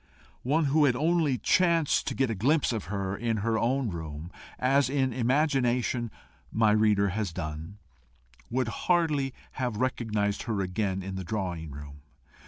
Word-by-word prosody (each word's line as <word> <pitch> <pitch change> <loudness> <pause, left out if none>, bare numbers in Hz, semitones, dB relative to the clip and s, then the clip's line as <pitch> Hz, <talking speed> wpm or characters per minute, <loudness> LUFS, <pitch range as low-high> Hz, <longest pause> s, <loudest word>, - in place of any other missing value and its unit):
One 150 +5 +1
who 150 +2 +4
had 125 -4 +3
only 155 -1 +2
chanced 170 - +2
to - - -2
get 130 -3 +1
a - - 0
glimpse 135 +7 +2
of 110 - -3
her 100 -1 -3
in 115 +1 -1
her 115 -1 +1
own 125 0 0
room, 80 0 -6 0.3
as 135 +1 +3
in 135 -2 +1
imagination 125 -2 +1 0.4
my 110 -1 +3
reader 105 -2 +3
has 100 -1 -2
done, 80 +3 -6 0.7
would 125 -1 0 0.2
hardly 155 -6 +2 0.3
have 125 -4 -1
recognised 110 -5 -1
her 105 -3 0
again 95 0 -1
in 95 0 -5
the 95 - -4
drawing 90 -5 -3
room. 70 0 -10
115 Hz, 155 wpm, -28 LUFS, 95-135 Hz, 0.7 s, who